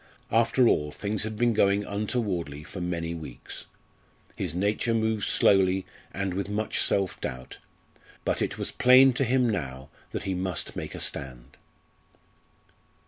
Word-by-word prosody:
After 115 +2 +4
all 75 -7 +2
things 100 +6 -3
had 110 0 -3
been 120 0 +2
going 100 -1 +2
untowardly 100 - -2
for 95 - -8
many 85 -1 -2
weeks. 80 -7 -6 0.7
His 80 - -3
nature 105 +5 0
moved 110 -2 0
slowly 95 -1 +4 0.3
and 100 -1 -2
with 100 +2 -3
much 105 +1 -2
self 95 -2 +1
doubt, 65 0 -6 0.7
but - - 0
it - - -1
was - - -3
plain 130 +1 +6
to 130 - 0
him 125 0 +2
now 70 - -3 0.2
that - - -5
he 95 - -2
must 90 -1 -2
make - - -5
a - - -6
stand. 65 -1 -2
100 Hz, 145 wpm, -27 LUFS, 85-110 Hz, 0.7 s, plain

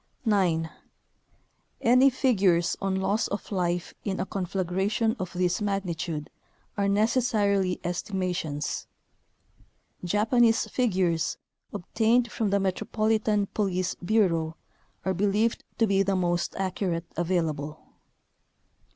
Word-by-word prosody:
9. 180 -7 +2 1.1
Any 255 +3 +6
figures 200 -10 +2
on 195 -1 0
loss 200 +3 +1
of 200 +1 -5
life 175 -2 -1
in 195 -2 -2
a - - 0
conflagra 190 0 -1
tion 225 +1 +1
of 185 -2 -4
this 180 +2 0
magnitude 175 -6 -2 0.4
are 200 -1 +1
necessarily 205 -3 +2
estima 180 +1 -2
tions. 150 -3 -3 1.2
Japanese 225 +5 +3
figures, 185 -9 0 0.3
obtained 230 +6 +1
from 220 -3 -1
the 200 +1 +2
Metropolitan 215 +2 +1
Police 185 -3 0
bureau, 175 -6 +2 0.5
are 190 - +1
believed 205 +4 +1
to 225 - +4
be 195 -2 +2
the 195 0 +1
most 175 -1 0
accurate 185 -3 -2
available. 160 -4 -1
195 Hz, 110 wpm, -27 LUFS, 175-215 Hz, 1.2 s, Any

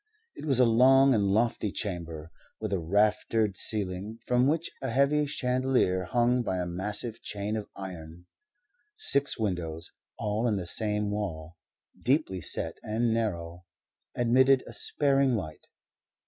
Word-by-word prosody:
It - - -8
was 135 -4 +3
a 125 - +6
long 135 +4 +5
and 105 -4 +2
lofty 110 0 +1
chamber, 85 -6 -5 0.3
with 110 -2 -3
a 95 - +1
raftered 105 +3 +1
ceiling, 100 +1 +2
from 125 +1 +2
which 160 +3 0
a 130 - -2
heavy 140 +4 +2
chandelier 125 -9 0
hung 120 +5 +2
by 95 -6 -2
a 90 - -2
massive 105 +6 -4
chain 105 +1 -4
of 105 -2 -5
iron. 90 -3 -9 0.7
Six 140 - +1
windows, 90 -6 -3 0.3
all 105 +3 -1
in 110 - +1
the 95 -3 -3
same 105 +2 -1
wall, 85 -6 -4 0.5
deeply 130 - 0
set - - -3
and 115 +2 0
narrow, 90 -6 -3 0.5
admitted 130 +2 +4
a - - -10
sparing 140 -3 +1
light. 80 -7 -6
105 Hz, 140 wpm, -28 LUFS, 90-125 Hz, 0.7 s, a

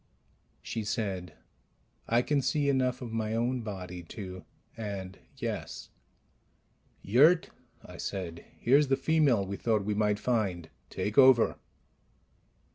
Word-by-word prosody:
She 110 - -4
said, 95 -6 -3 0.7
"I 120 +2 +3
can 145 0 +1
see 145 +1 +1
enough 130 -2 +1
of 115 -2 -7
my 110 -1 -1
own 120 +2 0
body 90 -5 -6
to 95 -2 -8 0.3
and 100 -4 -6 0.2
yes - - -5 0.6
..." - - -40
"Yurt," 150 - +4 0.3
I - - -11
said, 85 -4 -5
"here's 140 +4 +4
the 135 0 +2
female 135 -8 +2
we 100 +1 -5
thought 110 -4 0
we 105 - 0
might 105 0 +1
find. 95 -9 -1 0.2
Take 105 +5 0
over." 130 -3 +6
110 Hz, 125 wpm, -29 LUFS, 95-130 Hz, 0.7 s, over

